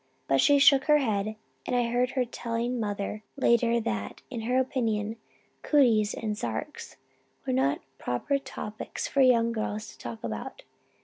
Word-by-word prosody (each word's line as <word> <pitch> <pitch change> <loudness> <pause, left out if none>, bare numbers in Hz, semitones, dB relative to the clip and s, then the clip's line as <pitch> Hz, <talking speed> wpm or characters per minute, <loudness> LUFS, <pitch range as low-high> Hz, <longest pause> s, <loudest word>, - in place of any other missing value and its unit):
But 135 0 +3
she 285 - +5
shook 275 -1 +6
her 300 -1 +5
head 215 -5 -1 0.3
and 250 - 0
I 240 -1 +1
heard 245 +1 +2
her 255 - +3
telling 235 +1 -3
mother 205 -1 -3 0.2
later 235 -2 +3
that, 105 - -4
in 235 -3 -4
her 250 +3 0
opinion, 225 -5 0 0.5
'cooties' 230 -8 +3
and 215 -2 -3
'sarks' 115 - -5 0.5
were 130 - -1
not 135 +2 +1 0.2
proper 125 - -1
subjects 215 -5 -6
for 280 - +1
young 235 -3 +5
girls 215 -1 -3
to - - -19
talk 115 -2 -7
about. 110 -2 -5
230 Hz, 160 wpm, -28 LUFS, 205-250 Hz, 0.5 s, shook